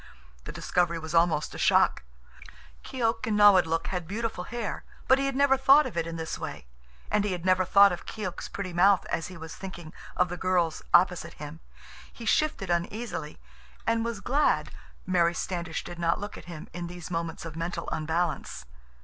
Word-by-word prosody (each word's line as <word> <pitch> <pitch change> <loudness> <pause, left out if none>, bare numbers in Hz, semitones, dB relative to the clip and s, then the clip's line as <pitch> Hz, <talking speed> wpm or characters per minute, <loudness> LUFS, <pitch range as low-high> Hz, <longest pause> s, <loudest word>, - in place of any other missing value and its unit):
The - - -6
discovery 175 -1 0
was 160 -1 -7
almost 165 -3 +2
a - - -8
shock. - - +4 0.8
Keok 225 -3 -1
and 210 -1 +1
Nawadlook 185 -6 +5
had 180 -3 -3
beautiful 215 -2 -3
hair, 240 -3 -4 0.2
but 265 - +5
he 275 - +1
had 275 - -2
never 275 -1 +4
thought 275 +3 +6
of - - -6
it 165 -1 -1
in 165 - -5
this 160 -1 -4
way. - - -6 0.5
And 210 - +2
he 205 -2 -1
had 175 -1 -5
never 185 0 +4
thought 200 0 +7
of 175 - -6
Keok's 210 -5 -5
pretty 190 -3 -5
mouth 190 +2 +4
as 165 - -1
he 185 - -10
was 160 -1 -8
thinking 175 -4 -9 0.2
of 180 -1 +3
the 180 - -5
girl's 175 -3 0
opposite 180 0 +3
him. 150 +2 -9 0.5
He 235 - -10
shifted 215 -8 +1
uneasily 175 -2 -3 0.5
and 230 0 +1
was 230 -4 -4
glad 285 +7 +1 0.3
Mary 175 -2 +2
Standish 170 -3 -3
did 175 -1 -9
not 170 +2 +1
look 205 0 -6
at - - -11
him 170 -3 -9
in 175 0 -5
these 175 0 -9
moments 165 -1 -3
of 160 -2 -7
mental 170 +1 -4
unbalance. 160 - -2
180 Hz, 185 wpm, -28 LUFS, 165-210 Hz, 0.8 s, thought